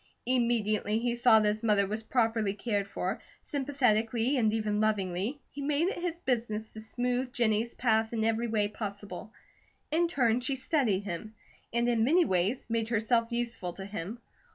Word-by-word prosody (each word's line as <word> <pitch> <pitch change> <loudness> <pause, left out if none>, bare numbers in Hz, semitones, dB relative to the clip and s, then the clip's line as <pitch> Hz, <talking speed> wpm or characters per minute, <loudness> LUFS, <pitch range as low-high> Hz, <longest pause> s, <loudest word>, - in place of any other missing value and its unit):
Immediately 225 -4 +1
he 240 +1 0
saw 240 -2 +6
that 215 - +2
his 210 +1 0
mother 210 -3 +3
was 215 +3 -3
properly 225 -3 +1
cared 205 -2 -1
for, - - -3 0.2
sympathetically 250 -3 +1
and 225 -5 +3
even 215 -1 0
lovingly, 210 +4 0
he 285 - -7
made 295 +5 +1
it 390 - -4
his 345 -2 -2
business 225 -7 -2
to 220 - -5
smooth 245 +3 -1
Jennie's 230 -1 +1
path 220 -2 +2
in 225 -2 -1
every 225 +1 +1
way 215 -2 +1
possible. 205 -1 -7 0.6
In 335 +2 +3
turn 245 -7 +2
she 265 +2 0
studied 260 - +1
him, 205 +3 -6 0.4
and 235 +1 +1
in 235 -2 +2
many 330 +8 +4
ways 190 - 0
made 225 -1 -1
herself 230 +1 +1
useful 230 -7 -2
to 190 - -7
him. 200 +2 -5
225 Hz, 170 wpm, -30 LUFS, 210-245 Hz, 0.6 s, saw